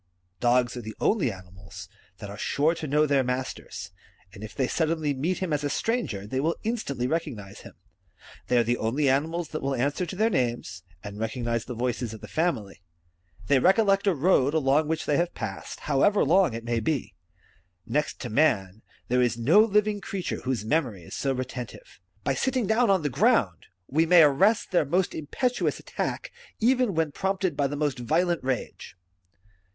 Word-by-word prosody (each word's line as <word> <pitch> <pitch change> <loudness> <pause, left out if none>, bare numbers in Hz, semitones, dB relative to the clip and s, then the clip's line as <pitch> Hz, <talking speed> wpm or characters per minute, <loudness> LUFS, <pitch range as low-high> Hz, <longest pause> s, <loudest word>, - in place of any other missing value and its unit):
Dogs 120 +2 +2
are 120 - -5
the 110 -1 -8
only 180 - +2
animals 95 0 -11 0.3
that 100 - -8
are - - -7
sure 150 +8 +1
to 160 -2 -6
know 150 +2 +3
their 140 -2 +2
masters; 125 +1 -4 0.4
and 100 - -10
if 110 - -9
they 130 - +1
suddenly 160 -2 0
meet 160 +8 -1
him 185 -5 -2
as 150 0 -1
a 145 - 0
stranger, 145 - -2
they 130 +5 -3
will 160 +4 0
instantly 205 - -2
recognize 125 -10 -3
him. - - -13 0.7
They 125 - +2
are 120 - +5
the 120 +2 0
only 130 +6 0
animals 160 +5 -1
that 155 - -5
will 135 0 -1
answer 145 +8 -1
to 175 - -6
their 220 +4 +2
names, 120 - -2 0.2
and 100 0 -8
recognize 115 0 -2
the 125 - -6
voices 120 -1 -2
of 110 - -13
the - - -9
family. 135 - -2 0.6
They 135 +5 +4
recollect 195 - +3
a 190 - +3
road 145 -2 +3
along 150 0 +2
which 160 0 -2
they 145 - +1
have 170 0 -1
passed, - - -6
however 150 +9 +3
long 170 -4 +3
it 115 - -6
may 120 0 -1
be. 140 +3 -2 0.7
Next 145 +7 -1
to 120 - -4
man, 110 -7 +1 0.3
there 125 +1 +2
is 120 -2 +1
no 145 - +4
living 210 -1 +3
creature 195 -2 -4
whose 125 -5 -2
memory 115 - -1
is - - -11
so 135 - -1
retentive. 130 - -6 0.2
By - - +1
sitting 260 -3 0
down 220 +2 +2
on 190 -4 +3
the 145 - 0
ground, - - +2 0.2
we 160 +4 +2
may 175 -1 +8
arrest 185 +10 +3
their 180 - +3
most 175 +6 0
impetuous 245 - -1
attack, - - -4 0.3
even 245 -3 +2
when 160 -2 +1
prompted 190 -1 -1
by 140 -1 +1
the 145 - -4
most 145 -3 -1
violent 170 +7 0
rage. 130 -7 -4
145 Hz, 185 wpm, -26 LUFS, 120-175 Hz, 0.7 s, may